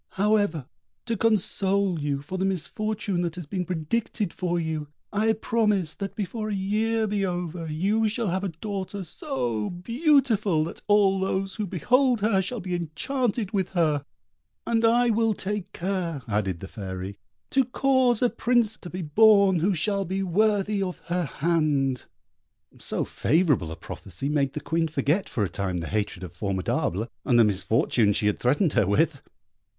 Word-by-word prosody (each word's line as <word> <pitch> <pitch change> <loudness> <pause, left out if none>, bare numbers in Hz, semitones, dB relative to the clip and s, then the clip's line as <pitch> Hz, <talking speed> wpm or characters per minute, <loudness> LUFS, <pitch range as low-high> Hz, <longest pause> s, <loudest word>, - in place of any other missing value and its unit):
However, 205 - +1 0.4
to 230 -1 -1
console 200 -4 +1
you 145 -1 -2
for 185 +6 -5
the - - 0
misfortune 195 +1 -1
that 170 -1 -2
has 175 -3 -6
been 180 +4 -3
predicted 185 +4 -2
for 175 -2 -1
you, 160 -2 -3 0.3
I 220 +2 +2
promise 210 -6 0
that 195 -1 -6
before 215 +2 -3
a 205 - -1
year 220 +3 0
be 205 -1 -1
over, 175 -2 -3
you 205 +8 +1
shall 230 -1 -1
have 185 +2 -1
a 195 - -1
daughter 195 +2 -5
so 120 -9 -3
beautiful 225 - +2
that 165 - -7
all 200 -2 +4
those 190 +1 -2
who 210 -2 -2
behold 245 - +2
her 205 -2 +3
shall 235 +6 -3
be 180 -2 -4
enchanted 205 - -2
with 190 -3 0
her, 155 -5 +2 0.6
and 230 -1 +1
I 235 +1 +4
will 225 -1 +2
take 205 0 -4
care," 175 -6 -3
added 100 -5 -1
the 95 - -6
Fairy, 95 -1 -6 0.3
"to 270 - +4
cause 255 -1 +2
a 245 - +4
Prince 235 -3 +2
to 175 - -9
be 180 0 -5
born 200 +3 +5
who 190 +4 +2
shall 200 +4 +1
be 190 +2 -2
worthy 205 +2 +1
of 185 -2 -2
her 180 -1 +1
hand." 145 -4 0 0.7
So - - -2
favourable 145 - +1
a - - -5
prophecy 100 - -5
made 140 -3 +1
the 150 - -4
Queen 165 +1 0
forget 155 +5 0
for 110 - -1
a - - +1
time 95 -3 -2
the 85 - -3
hatred 100 -3 -2
of 90 -2 -8
Formidable, 95 +2 -1 0.2
and 120 - +3
the - - +8
misfortune 105 +1 +2
she 105 - 0
had 105 - +1
threatened 145 +7 +2
her 95 - +3
with. 100 +1 +2
185 Hz, 170 wpm, -26 LUFS, 150-210 Hz, 0.7 s, the